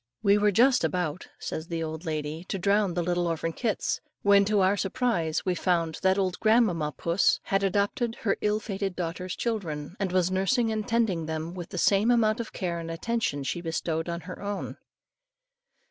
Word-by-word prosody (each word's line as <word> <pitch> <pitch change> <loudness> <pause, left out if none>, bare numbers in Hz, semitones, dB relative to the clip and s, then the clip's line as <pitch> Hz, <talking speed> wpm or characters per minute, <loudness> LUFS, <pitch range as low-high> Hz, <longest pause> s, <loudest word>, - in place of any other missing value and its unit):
"We 200 0 +5
were 210 0 +4
just 245 +6 +4
about," 180 -2 -1
says 160 +1 -5
the 165 -1 -3
lady, 155 0 -4
"to 195 - -3
drown 200 -1 +2
the 175 - 0
little 175 0 0
orphan 165 0 -2
kits, 225 0 -1 0.2
when, 200 0 +6
to 205 -1 +2
our 190 +2 +4
surprise, 195 -6 0
we 185 - +2
found 170 -2 0
that 190 0 +3
old 185 -2 0
grandmamma 215 -9 +3
puss 170 +7 +2
had 195 0 0
adopted 205 +5 0
her 200 -3 +1
ill 210 0 +1
fated 195 -3 -3
daughter's 180 +1 -4
children, 175 -9 -3
and 195 -3 -1
was 185 0 +2
nursing 220 +5 +2
and 215 -1 -2
tending 210 -9 +1
them, 160 +1 -4
with 175 -2 -7
the - - -6
same 200 +5 +3
amount 225 -2 +3
of 230 - -4
care 175 -3 -3
and 165 0 -6
attention 165 -4 -1
she 175 +5 -3
bestowed 165 0 -2
on 170 0 -3
her 180 +3 -9
own." 205 0 -4
185 Hz, 185 wpm, -27 LUFS, 165-210 Hz, 0.2 s, when